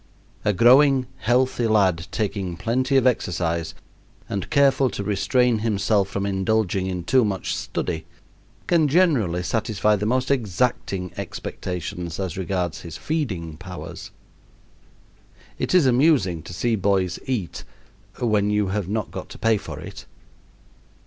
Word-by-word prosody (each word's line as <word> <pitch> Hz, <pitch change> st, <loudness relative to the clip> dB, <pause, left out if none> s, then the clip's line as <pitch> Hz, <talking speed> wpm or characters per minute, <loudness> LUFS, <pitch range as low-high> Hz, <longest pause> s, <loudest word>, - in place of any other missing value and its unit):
A 105 Hz, -, +3 dB
growing, 130 Hz, +5 st, +5 dB
healthy 125 Hz, 0 st, +1 dB
lad, 95 Hz, -6 st, +2 dB
taking 95 Hz, -5 st, -3 dB
plenty 130 Hz, +6 st, +1 dB
of 130 Hz, -, +3 dB
exercise 85 Hz, -9 st, 0 dB, 0.5 s
and 100 Hz, -, -4 dB
careful 140 Hz, -2 st, +4 dB
to 100 Hz, -, -5 dB
restrain 115 Hz, +4 st, +2 dB
himself 105 Hz, -2 st, +1 dB
from 100 Hz, 0 st, -2 dB
indulging 95 Hz, -1 st, 0 dB
in 90 Hz, -2 st, -3 dB
too 130 Hz, +7 st, +3 dB
much 100 Hz, -3 st, -2 dB
study, -, -, -4 dB, 0.6 s
can 165 Hz, -3 st, +3 dB
generally 135 Hz, -, +2 dB
satisfy 105 Hz, +1 st, +1 dB
the 105 Hz, +1 st, -2 dB
most 130 Hz, +3 st, +1 dB
exacting 100 Hz, -5 st, -1 dB
expectations 90 Hz, -1 st, -5 dB
as 95 Hz, -4 st, -3 dB
regards 90 Hz, -2 st, -2 dB
his 80 Hz, -2 st, -8 dB
feeding 90 Hz, -, -3 dB
powers. 90 Hz, +1 st, -8 dB, 1.5 s
It -, -, 0 dB
is 175 Hz, -6 st, +6 dB
amusing 130 Hz, -, +3 dB
to -, -, -8 dB
see 115 Hz, +5 st, 0 dB
boys 95 Hz, -3 st, 0 dB
eat 115 Hz, -10 st, -3 dB, 0.6 s
when 105 Hz, -4 st, +2 dB
you 105 Hz, -2 st, +1 dB
have 100 Hz, -2 st, -2 dB
not 110 Hz, 0 st, -2 dB
got -, -, -7 dB
to -, -, -10 dB
pay 115 Hz, -1 st, +2 dB
for 80 Hz, -7 st, -8 dB
it. 90 Hz, +2 st, -10 dB
105 Hz, 135 wpm, -23 LUFS, 90-125 Hz, 1.5 s, is